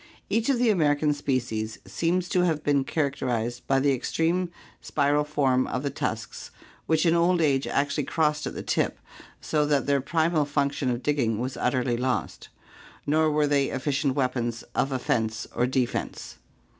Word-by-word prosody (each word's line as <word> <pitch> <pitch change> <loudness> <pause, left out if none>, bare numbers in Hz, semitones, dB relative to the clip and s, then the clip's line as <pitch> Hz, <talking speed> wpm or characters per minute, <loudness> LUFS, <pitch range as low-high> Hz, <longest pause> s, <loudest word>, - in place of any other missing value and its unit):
Each 225 +3 +1
of 270 - +3
the 240 -2 +3
American 150 -5 +2
species 120 -6 -2
seems 175 +2 0
to 180 - +2
have 160 -4 0
been 140 -2 +2
characterized 125 -5 -2
by 135 0 +3
the 140 0 +3
extreme 165 +7 0 0.3
spiral 145 0 +1
form 135 -4 +1
of 130 - -3
the 140 - -1
tusks 110 -5 -4 0.4
which 160 +1 +2
in 165 - +4
old 170 +1 +3
age 140 -4 +2
actually 140 0 0
crossed 150 0 0
at - - -6
the - - -5
tip - - 0 0.4
so 150 -1 +1
that 145 -2 +2
their 140 -1 +2
primal 160 +1 +1
function 140 -1 0
of 120 0 -2
digging 125 -7 +1
was 125 +3 -3
utterly 125 -1 0
lost, 125 +1 -2 0.6
nor 155 +2 +3
were 150 0 +2
they 140 -1 +2
efficient 135 0 -1
weapons 120 -4 -1
of 135 - 0
offense 110 -4 -1
or 125 - +1
defense. 130 -1 -2
140 Hz, 165 wpm, -26 LUFS, 130-155 Hz, 0.6 s, in